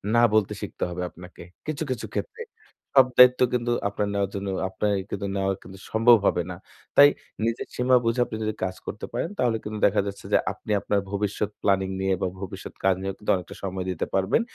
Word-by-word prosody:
না 120 Hz, -, +6 dB
বলতে 110 Hz, -2 st, +3 dB
শিখতে -, -, -5 dB
হবে 90 Hz, +1 st, -5 dB
আপনাকে। 90 Hz, 0 st, -12 dB, 0.2 s
কিছু, 155 Hz, 0 st, -2 dB
কিছু 130 Hz, -, -3 dB
ক্ষেত্রে। 460 Hz, -1 st, -4 dB, 0.6 s
সব 130 Hz, -1 st, +8 dB
দায়িত্ব 125 Hz, 0 st, +8 dB
কিন্তু 120 Hz, -1 st, 0 dB, 0.2 s
আপনার 100 Hz, 0 st, -2 dB
নেওয়ার 100 Hz, -1 st, 0 dB
জন্য 100 Hz, 0 st, -3 dB, 0.2 s
আপনার 105 Hz, +2 st, -1 dB, 0.2 s
কিন্তু 100 Hz, 0 st, -3 dB
নেওয়া 95 Hz, 0 st, +1 dB
কিন্তু 95 Hz, +1 st, -12 dB
সম্ভব 115 Hz, +2 st, +6 dB
হবে 90 Hz, -, +2 dB
না। -, -, -5 dB, 0.4 s
তাই 145 Hz, 0 st, +10 dB, 0.4 s
নিজের 115 Hz, +1 st, -2 dB
সীমা 125 Hz, +1 st, +3 dB
বুঝে 115 Hz, +2 st, +1 dB
আপনি 110 Hz, -, -6 dB
যদি 110 Hz, 0 st, -1 dB
কাজ 95 Hz, 0 st, -2 dB
করতে 105 Hz, -, -5 dB
পারেন 120 Hz, +7 st, -1 dB
তাহলে 120 Hz, -3 st, +2 dB
কিন্তু 105 Hz, 0 st, -5 dB
দেখা 100 Hz, +1 st, +3 dB
যাচ্ছে 100 Hz, 0 st, -7 dB
যে -, -, +7 dB
আপনি -, -, -8 dB
আপনার 100 Hz, -, +1 dB
ভবিষ্যৎ 105 Hz, +1 st, -1 dB
প্ল্যানিং 95 Hz, -1 st, +2 dB
নিয়ে 95 Hz, 0 st, +2 dB
বা, -, -, +1 dB
ভবিষ্যৎ 95 Hz, 0 st, -7 dB
কাজ 95 Hz, -1 st, +4 dB
নিয়েও 95 Hz, 0 st, -3 dB
কিন্তু 105 Hz, -, 0 dB
অনেকটা 90 Hz, -2 st, -7 dB
সময় 95 Hz, -1 st, -3 dB
দিতে 90 Hz, -, -2 dB
পারবেন। 95 Hz, -, +2 dB
100 Hz, 200 wpm, -25 LUFS, 95-115 Hz, 0.6 s, তাই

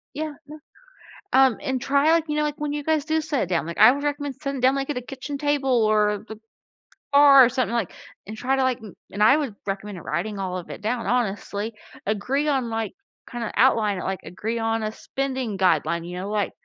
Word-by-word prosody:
Yeah, 310 Hz, +1 st, -3 dB, 0.2 s
yeah. 300 Hz, +1 st, -10 dB, 0.8 s
Um, 265 Hz, -3 st, +5 dB
and 260 Hz, -1 st, -2 dB
try, 280 Hz, +4 st, +2 dB
like, 330 Hz, -1 st, +3 dB
you 300 Hz, -, -1 dB
know, 300 Hz, -, +2 dB
like, 300 Hz, 0 st, -2 dB
when 295 Hz, -1 st, -2 dB
you 295 Hz, 0 st, -3 dB
guys 310 Hz, -1 st, +1 dB
do 315 Hz, +1 st, +1 dB
sit 295 Hz, -, -1 dB
down, 170 Hz, -3 st, 0 dB
like, 170 Hz, -, -6 dB
I 245 Hz, -, +8 dB
would 285 Hz, +1 st, -4 dB
recommend 290 Hz, -2 st, -2 dB
sitting 275 Hz, -2 st, -3 dB
down, 260 Hz, +2 st, +4 dB
like, 275 Hz, 0 st, -2 dB
at 295 Hz, -, -3 dB
a 250 Hz, -, -3 dB
kitchen 270 Hz, +3 st, -6 dB
table 270 Hz, -5 st, +1 dB
or 210 Hz, -1 st, +2 dB
the 220 Hz, -2 st, -10 dB, 0.7 s
bar 280 Hz, -2 st, +8 dB
or -, -, +2 dB
something, 250 Hz, -1 st, -1 dB
like 230 Hz, -7 st, -1 dB, 0.3 s
and 215 Hz, -, -6 dB
try 260 Hz, +4 st, 0 dB
to, 265 Hz, -, +1 dB
like 260 Hz, -1 st, 0 dB
m 215 Hz, -4 st, -11 dB, 0.2 s
and, 205 Hz, +2 st, 0 dB
I 265 Hz, +7 st, +6 dB
would 275 Hz, -9 st, -3 dB
recommend 195 Hz, -3 st, -5 dB
writing 195 Hz, +6 st, -3 dB
all 185 Hz, -1 st, -3 dB
of 180 Hz, -, -8 dB
it -, -, -8 dB
down, 230 Hz, +3 st, -2 dB
honestly. 215 Hz, -2 st, -1 dB, 0.3 s
Agree 250 Hz, +8 st, 0 dB
on, 260 Hz, -5 st, 0 dB
like 225 Hz, -1 st, -3 dB, 0.4 s
kinda 235 Hz, -2 st, -4 dB
outline 215 Hz, -6 st, +3 dB
it, -, -, -5 dB
like, 190 Hz, 0 st, -3 dB
agree 220 Hz, +6 st, -4 dB
on 225 Hz, 0 st, -1 dB
a 215 Hz, -, -2 dB
spending 260 Hz, -3 st, -4 dB
guideline, 170 Hz, -2 st, +1 dB
you 180 Hz, 0 st, -6 dB
know, 190 Hz, +2 st, -5 dB
like, 210 Hz, -1 st, -1 dB
240 Hz, 225 wpm, -24 LUFS, 210-280 Hz, 0.8 s, I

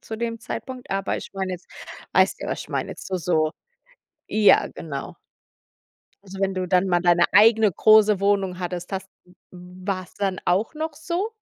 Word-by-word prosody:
zu 220 Hz, -, -7 dB
dem 230 Hz, 0 st, -4 dB
Zeitpunkt, 255 Hz, +2 st, -7 dB
aber 195 Hz, 0 st, -1 dB
ich -, -, -8 dB
meine 190 Hz, -1 st, -3 dB
jetzt 180 Hz, 0 st, -9 dB, 0.4 s
weißt -, -, +3 dB
ja, -, -, -4 dB
was -, -, -3 dB
ich -, -, -15 dB
meine, -, -, -3 dB
jetzt -, -, -9 dB
so, 190 Hz, -, -2 dB
so 160 Hz, -3 st, 0 dB, 0.8 s
ja, 215 Hz, -1 st, +4 dB
genau. 140 Hz, -4 st, -7 dB, 1.1 s
Also, 195 Hz, 0 st, -10 dB
wenn 195 Hz, 0 st, +1 dB
du 185 Hz, 0 st, -2 dB
dann 185 Hz, 0 st, +3 dB
mal 175 Hz, -1 st, +2 dB
deine 175 Hz, -1 st, +4 dB
eigene 215 Hz, 0 st, +6 dB
große 215 Hz, -1 st, +5 dB
Wohnung 195 Hz, -2 st, +1 dB
hattest, 180 Hz, +1 st, -5 dB
hast 190 Hz, 0 st, -4 dB, 0.2 s
d 180 Hz, -, -22 dB, 0.2 s
war's 185 Hz, +1 st, -6 dB
dann 195 Hz, -2 st, -2 dB
auch 190 Hz, -, +1 dB
noch 310 Hz, 0 st, -4 dB
so? 345 Hz, +8 st, -3 dB
195 Hz, 180 wpm, -23 LUFS, 180-215 Hz, 1.1 s, eigene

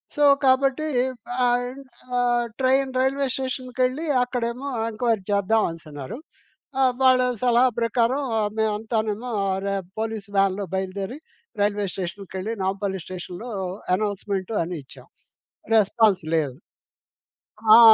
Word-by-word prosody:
So, 295 Hz, -, +2 dB, 0.2 s
కాబట్టి 270 Hz, +3 st, +3 dB, 0.6 s
ఆహ్, 245 Hz, +2 st, 0 dB, 0.4 s
ఆహ్, 240 Hz, -1 st, +2 dB
ట్రైన్ 265 Hz, +1 st, +3 dB
రైల్వే 270 Hz, +1 st, +1 dB
స్టేషన్‌కెళ్లి 255 Hz, +2 st, -1 dB, 0.2 s
అక్కడేమో 250 Hz, +2 st, -3 dB, 0.2 s
ఎంక్వైరీ 225 Hz, -2 st, 0 dB
చేద్దాం 200 Hz, +2 st, +3 dB
అనేసన్నారు. 155 Hz, -, -8 dB, 0.6 s
ఆ! -, -, +5 dB, 0.2 s
వాళ్ళ 255 Hz, -1 st, +6 dB, 0.2 s
సలహా 245 Hz, +1 st, +4 dB
ప్రకారం 235 Hz, +4 st, +1 dB, 0.2 s
ఆహ్, 210 Hz, -1 st, +1 dB
మేమంతానేమో 220 Hz, +1 st, -1 dB, 0.3 s
అరే! 200 Hz, +1 st, -2 dB, 0.3 s
పోలీస్ 220 Hz, -2 st, -3 dB
వ్యాన్‌లో 195 Hz, 0 st, +2 dB
బయలుదేరి 195 Hz, +7 st, -3 dB, 0.4 s
రైల్వే 205 Hz, 0 st, +1 dB
స్టేషన్‌కెళ్లి 190 Hz, +3 st, -4 dB
నాంపల్లి 190 Hz, 0 st, -1 dB
స్టేషనులో 185 Hz, +5 st, -7 dB, 0.5 s
అనౌన్స్‌మెంట్ 200 Hz, -1 st, -2 dB
అని 175 Hz, +1 st, -4 dB
ఇచ్చాం. -, -, -15 dB, 0.7 s
రెస్పాన్స్ 210 Hz, -2 st, +4 dB
లేదు. 140 Hz, -5 st, -1 dB, 1.2 s
ఆ! -, -, +9 dB
220 Hz, 105 wpm, -24 LUFS, 195-250 Hz, 1.2 s, ఆ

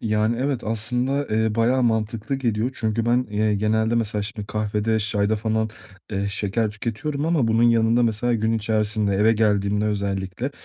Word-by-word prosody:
Yani 110 Hz, +1 st, +1 dB
evet 135 Hz, -2 st, -1 dB
aslında, 125 Hz, +6 st, 0 dB
eee, 110 Hz, 0 st, +1 dB
bayağı 120 Hz, +3 st, +2 dB
mantıklı 110 Hz, +2 st, -1 dB
geliyor. 120 Hz, -3 st, -1 dB
Çünkü 115 Hz, -1 st, -1 dB
ben, 125 Hz, +2 st, +2 dB
eee, 105 Hz, 0 st, +1 dB
genelde 110 Hz, +2 st, +1 dB
mesela 110 Hz, -3 st, 0 dB
şimdi 105 Hz, 0 st, -6 dB
kahvede, 105 Hz, +1 st, -1 dB
çayda 105 Hz, 0 st, 0 dB
falan, 110 Hz, 0 st, -1 dB, 0.4 s
eee, 100 Hz, +1 st, -1 dB
şeker 105 Hz, +2 st, -1 dB
tüketiyorum 140 Hz, +8 st, -3 dB
ama 160 Hz, -8 st, +2 dB
bunun 115 Hz, +1 st, +2 dB
yanında 115 Hz, 0 st, +4 dB
mesela 120 Hz, +1 st, +1 dB
gün 110 Hz, 0 st, 0 dB
içerisinde 110 Hz, -2 st, 0 dB
eve 110 Hz, +3 st, +4 dB
geldiğimde 105 Hz, -1 st, +1 dB
özellikle, 100 Hz, +3 st, -2 dB
110 Hz, 160 wpm, -23 LUFS, 105-115 Hz, 0.4 s, yanında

